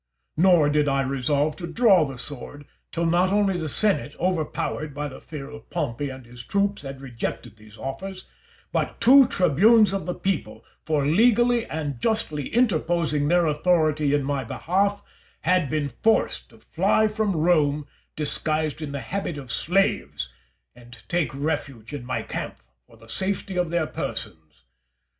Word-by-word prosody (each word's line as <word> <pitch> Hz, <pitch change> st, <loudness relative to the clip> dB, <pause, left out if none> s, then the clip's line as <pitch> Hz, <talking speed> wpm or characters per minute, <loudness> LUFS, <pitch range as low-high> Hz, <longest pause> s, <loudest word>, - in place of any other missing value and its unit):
Nor 170 Hz, -3 st, +5 dB
did 150 Hz, 0 st, +2 dB
I 135 Hz, -1 st, +2 dB
resolve 140 Hz, +3 st, 0 dB
to 170 Hz, -, -5 dB
draw 190 Hz, -3 st, +4 dB
the 135 Hz, -2 st, -7 dB
sword 145 Hz, +3 st, -6 dB, 0.3 s
till 170 Hz, 0 st, -1 dB
not 175 Hz, +3 st, +3 dB
only 200 Hz, -2 st, +2 dB
the 160 Hz, -3 st, -3 dB
senate, 155 Hz, -6 st, +1 dB
overpowered 155 Hz, -4 st, -2 dB
by 150 Hz, 0 st, -3 dB
the 130 Hz, -, -10 dB
fear 145 Hz, -4 st, -8 dB
of 145 Hz, -, -12 dB
Pompey 135 Hz, +5 st, -2 dB
and 130 Hz, -1 st, -9 dB
his 120 Hz, 0 st, -11 dB
troops, 200 Hz, +4 st, 0 dB
had 135 Hz, -1 st, -8 dB
rejected 120 Hz, -3 st, -5 dB
these 110 Hz, 0 st, -16 dB
offers, 185 Hz, -, -6 dB, 0.5 s
but -, -, -2 dB
two 265 Hz, +1 st, +7 dB
tribunes 195 Hz, -, +4 dB
of 195 Hz, -2 st, -3 dB
the 180 Hz, -, -2 dB
people, 195 Hz, 0 st, -3 dB, 0.2 s
for 150 Hz, -3 st, +1 dB
legally 240 Hz, +7 st, +3 dB
and 145 Hz, -6 st, -4 dB
justly 155 Hz, -, -1 dB
interposing 170 Hz, -9 st, +1 dB
their 175 Hz, +1 st, +3 dB
authority 155 Hz, -2 st, +2 dB
in 145 Hz, -, 0 dB
my 140 Hz, -1 st, -1 dB
behalf, 195 Hz, -, 0 dB, 0.4 s
had 180 Hz, -6 st, +2 dB
been 150 Hz, -2 st, -1 dB
forced 225 Hz, 0 st, +1 dB
to -, -, -18 dB
fly 220 Hz, -, +2 dB
from 215 Hz, -3 st, -1 dB
Rome 150 Hz, -3 st, +2 dB, 0.3 s
disguised 155 Hz, 0 st, -2 dB
in 145 Hz, -2 st, -5 dB
the 140 Hz, -, -3 dB
habit 170 Hz, -, -4 dB
of 130 Hz, -4 st, -7 dB
slaves, 180 Hz, -, 0 dB, 0.4 s
and 120 Hz, -1 st, -14 dB
take 170 Hz, -6 st, +1 dB
refuge 135 Hz, -4 st, -4 dB
in 140 Hz, -4 st, -6 dB
my 130 Hz, -, -2 dB
camp -, -, -5 dB, 0.3 s
for 115 Hz, -, -19 dB
the 115 Hz, +1 st, -17 dB
safety 190 Hz, -, -3 dB
of 180 Hz, -2 st, 0 dB
their 170 Hz, -1 st, +1 dB
persons. 80 Hz, -, -6 dB
155 Hz, 160 wpm, -24 LUFS, 140-185 Hz, 0.5 s, two